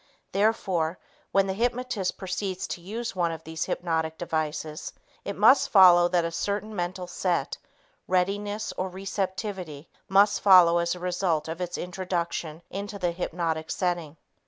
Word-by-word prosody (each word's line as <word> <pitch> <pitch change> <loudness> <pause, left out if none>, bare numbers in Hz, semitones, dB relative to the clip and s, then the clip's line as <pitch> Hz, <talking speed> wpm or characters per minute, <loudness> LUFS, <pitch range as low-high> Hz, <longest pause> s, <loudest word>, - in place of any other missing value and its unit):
Therefore, 190 -5 +1 0.3
when 195 0 +3
the 190 - -2
hypnotist 240 -2 -1
proceeds 185 0 -3
to 175 - -5
use 220 +5 -5
one 170 -2 +1
of 165 - -7
these 160 0 -4
hypnotic 160 -2 -2
devices, 155 -1 -3 0.3
it - - -4
must 270 - +5
follow 180 -3 +7
that 175 -1 +1
a 165 - -2
certain 205 +4 -3
mental 180 0 -3
set, 180 - -1 0.5
readiness, 205 +3 0
or 185 +1 -2
receptivity 190 -4 -4 0.2
must 200 +1 +4
follow 180 -3 +7
as 170 +1 0
a - - -9
result 180 -3 0
of 165 +2 -5
its 175 -1 -3
introduction 175 -3 -3
into 200 +1 -5
the 180 -3 0
hypnotic 165 -2 -3
setting. 175 -5 -2
180 Hz, 145 wpm, -27 LUFS, 170-195 Hz, 0.5 s, follow